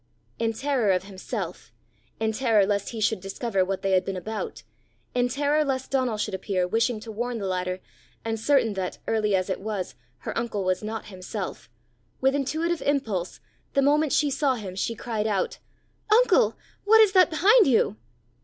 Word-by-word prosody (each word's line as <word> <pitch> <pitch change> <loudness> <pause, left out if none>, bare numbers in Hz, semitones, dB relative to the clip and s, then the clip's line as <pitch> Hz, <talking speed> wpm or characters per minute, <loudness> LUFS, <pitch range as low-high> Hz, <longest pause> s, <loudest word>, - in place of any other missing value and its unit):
In 225 0 0
terror 260 -2 0
of 185 -1 +2
himself, 190 -1 -6 0.5
in 220 0 +1
terror 220 -3 +3
lest 200 0 -1
he 230 - -6
should 215 -1 +1
discover 195 +1 -1
what 190 +1 -3
they 195 - +1
had 185 -1 +4
been 190 0 -4
about, 215 +4 -5 0.5
in 245 0 +1
terror 290 +3 +2
lest 265 -2 -2
Donal 255 -5 +1
should 210 -1 -2
appear, 190 -1 -1
wishing 225 +3 +1
to 225 0 -8
warn 240 +2 -3
the 205 - -4
latter, 185 0 -2 0.4
and 225 -1 -2
certain 235 -2 +3
that, 190 -2 -3
early 215 -2 +2
as 185 -1 0
it 190 - -2
was, 205 -3 -3 0.3
her - - -5
uncle 230 -4 -2
was 185 0 0
not 215 0 -5
himself, 185 -1 -6 0.5
with 265 +1 +3
intuitive 315 +5 -1
impulse, 225 -11 -1 0.3
the 275 - +4
moment 295 +1 +3
she 290 0 +2
saw 275 -1 +1
him, 200 -6 -6
she 230 +4 -2
cried 220 -1 -2
out, 200 -3 -1 0.5
"Uncle! 430 - +4 0.3
what 445 +2 +6
is 430 -3 +7
that 370 -2 +6
behind 400 +7 +5
you?" 235 - +3
225 Hz, 180 wpm, -26 LUFS, 195-275 Hz, 0.5 s, is